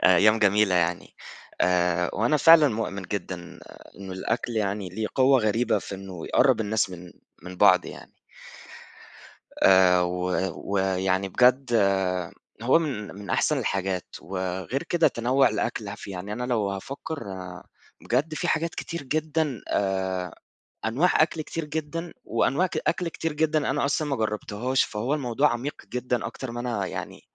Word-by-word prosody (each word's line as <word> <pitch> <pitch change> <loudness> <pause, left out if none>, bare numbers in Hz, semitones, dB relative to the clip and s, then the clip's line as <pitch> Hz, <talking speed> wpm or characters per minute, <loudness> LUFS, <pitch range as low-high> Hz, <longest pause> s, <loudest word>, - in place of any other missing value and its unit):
أيام 105 +5 +6
جميلة 105 -2 +3
يعني. 85 0 0 0.5
آآ 90 -1 +2
وأنا 115 +8 +2
فعلًا 160 0 +7
مؤمن 105 -4 -3
جدًا 90 -2 -6 0.4
إنه 95 -1 -8
الأكل 110 +6 -2
يعني 100 -2 -1
ليه 105 +5 -3
قوة 130 0 +5
غريبة 110 +1 +1
في 100 - -7
إنه 95 -3 -8
يقرّب 130 -3 +3
الناس 110 -2 0
من 90 -1 -10 0.3
من 90 +1 -9
بعض 90 -1 +5
يعني. - - -10 1.5
آآ 95 -1 +6
و 90 +1 -2 0.5
ويعني 95 0 +1
بجد 125 +4 +3 0.9
هو 130 +6 +5
من 130 - -4
من 100 -1 -8
أحسن - - +2
الحاجات 95 -2 -2
وغير 95 - -3
كده 170 -2 +2
تنوّع 130 +3 +2
الأكل - - -3
هف - - -8
يعني 100 +1 -6
أنا 125 +3 -3
لو 115 -5 0
هافكر 135 +7 -6 0.8
بجد 145 +6 0
في - - -2
حاجات 165 +1 0
كتير 170 -4 -5
جدًا 155 -3 -1
آآ 95 -2 -1 0.5
أنواع 140 +13 +3
أكل 160 0 -2
كتير 165 +1 -5
جدًا، 160 +3 -4
وأنواع 135 +10 +1
ك 175 - -5
أكل 180 - 0
كتير 165 -1 -3
جدًا 155 -2 +1
أنا 145 +1 0
أصلًا 145 +2 0
ما 140 - 0
جربتهاش 110 +3 -1
فهو 115 +6 -2
الموضوع 140 0 +1
عميق 120 +5 -3 0.2
جدًا 125 -3 -1
أكتر 120 +3 -7
ما 120 - -5
أنا 120 -5 -2
يعني - - -6
110 Hz, 145 wpm, -25 LUFS, 95-140 Hz, 1.5 s, فعلًا